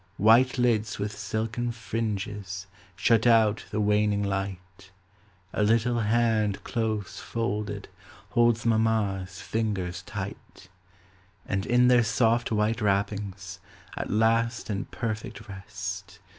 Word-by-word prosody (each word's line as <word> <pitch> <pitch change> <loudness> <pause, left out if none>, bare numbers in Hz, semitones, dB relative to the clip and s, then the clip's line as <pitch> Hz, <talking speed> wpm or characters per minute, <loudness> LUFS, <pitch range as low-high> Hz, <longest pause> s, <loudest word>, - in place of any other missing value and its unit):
White 120 +6 +5
lids 115 -3 +1
with 105 +1 -3
silken 110 +4 -2
fringes 105 -5 -4 0.3
Shut 110 +5 +3
out 110 -2 +4
the 105 - -2
waning 105 0 +2
light; 95 -1 -4 0.6
A - - 0
little 115 +3 +2
hand 110 -2 +1
close 110 -4 -2
folded, 105 -3 -3 0.4
Holds 120 -1 +3
mamma's 110 -5 +1
fingers 95 -5 -2
tight; 100 -2 -8 0.8
And 100 0 -2
in 125 +1 +4
their 125 -1 +6
soft 115 +1 +2
white 110 +2 +1
wrappings, 100 -2 -1 0.4
At - - -4
last 115 +2 +1
in 100 0 -2
perfect 115 +1 -5
rest. 95 -1 -7
105 Hz, 110 wpm, -27 LUFS, 100-115 Hz, 0.8 s, their